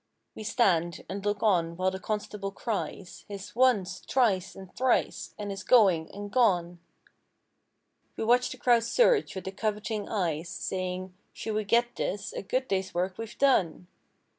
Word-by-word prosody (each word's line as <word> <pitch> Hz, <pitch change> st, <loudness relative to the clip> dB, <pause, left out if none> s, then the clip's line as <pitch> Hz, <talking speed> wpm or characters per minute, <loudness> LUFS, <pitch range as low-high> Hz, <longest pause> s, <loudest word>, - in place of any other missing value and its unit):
We 220 Hz, -, -8 dB
stand 175 Hz, -7 st, +1 dB
and 195 Hz, +2 st, -5 dB
look 205 Hz, 0 st, -1 dB
on 170 Hz, -5 st, +2 dB
while 185 Hz, +1 st, +1 dB
the 190 Hz, -, -5 dB
constable 210 Hz, -1 st, -3 dB
cries 195 Hz, -3 st, -5 dB
His 200 Hz, 0 st, -8 dB
"Once!" 205 Hz, -7 st, +2 dB
"Twice" 200 Hz, -8 st, +1 dB
and 190 Hz, -1 st, -12 dB
"Thrice!" 255 Hz, 0 st, 0 dB
and 205 Hz, -1 st, -4 dB
his 195 Hz, -, -5 dB
"Going!" 190 Hz, -10 st, +4 dB
and 205 Hz, 0 st, -7 dB
"Gone!" 180 Hz, -8 st, +2 dB, 1.4 s
We -, -, -2 dB
watch 245 Hz, +3 st, +3 dB
the 260 Hz, -, -7 dB
crowd 240 Hz, -2 st, +4 dB
surge, 455 Hz, -, +3 dB
with 190 Hz, -, -5 dB
the 190 Hz, -, -5 dB
coveting 210 Hz, +1 st, -3 dB
eyes 170 Hz, -5 st, -1 dB
Saying—"Should 185 Hz, +4 st, -5 dB
we 215 Hz, 0 st, -1 dB
get 240 Hz, +3 st, +2 dB
this 200 Hz, -, -3 dB
a -, -, -4 dB
good 255 Hz, +6 st, -1 dB
day's 190 Hz, -1 st, -2 dB
work 185 Hz, +2 st, -1 dB
we've 225 Hz, 0 st, -7 dB
done!" 190 Hz, -, +2 dB
200 Hz, 160 wpm, -28 LUFS, 185-225 Hz, 1.4 s, Going